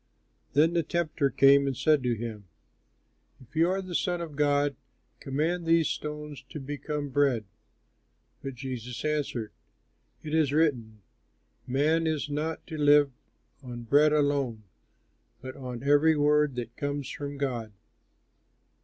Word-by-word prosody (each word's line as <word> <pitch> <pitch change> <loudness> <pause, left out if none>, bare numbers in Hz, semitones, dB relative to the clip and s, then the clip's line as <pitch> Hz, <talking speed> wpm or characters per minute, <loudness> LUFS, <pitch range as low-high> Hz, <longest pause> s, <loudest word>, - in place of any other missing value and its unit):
Then 155 +4 +4
the 170 - +2
tempter 160 -3 0
came 140 +1 +5
and 135 -3 -2
said 150 +1 +3
to 125 -2 0
him, 110 -2 -6 0.9
"If 130 +3 -19
you 165 +2 +4
are 190 +1 -1
the 185 -1 -8
Son 175 0 0
of 165 -4 -6
God, 145 -1 +2 0.4
command 160 +5 -1
these 165 -1 +4
stones 150 -1 -5
to 150 - -7
become 145 +1 -4
bread." 135 -5 +2 1.0
But 135 -1 -6
Jesus 125 0 -6
answered, 145 -7 -2 0.7
"It 150 - -6
is 155 -3 +3
written, 120 -10 0 0.6
"'Man 155 +5 +2
is 155 -2 -2
not 155 +2 -3
to 155 -3 -7
live 145 -1 +5 0.5
on 120 -2 -8
bread 145 +6 +4
alone, 140 -7 +1 0.8
But 130 0 -8
on 125 -2 -7
every 145 +3 +4
word 150 -1 +3
that 120 -1 -5
comes 145 -1 -3
from 145 0 -6
God.'" 120 -6 -3
145 Hz, 135 wpm, -28 LUFS, 130-155 Hz, 1.0 s, came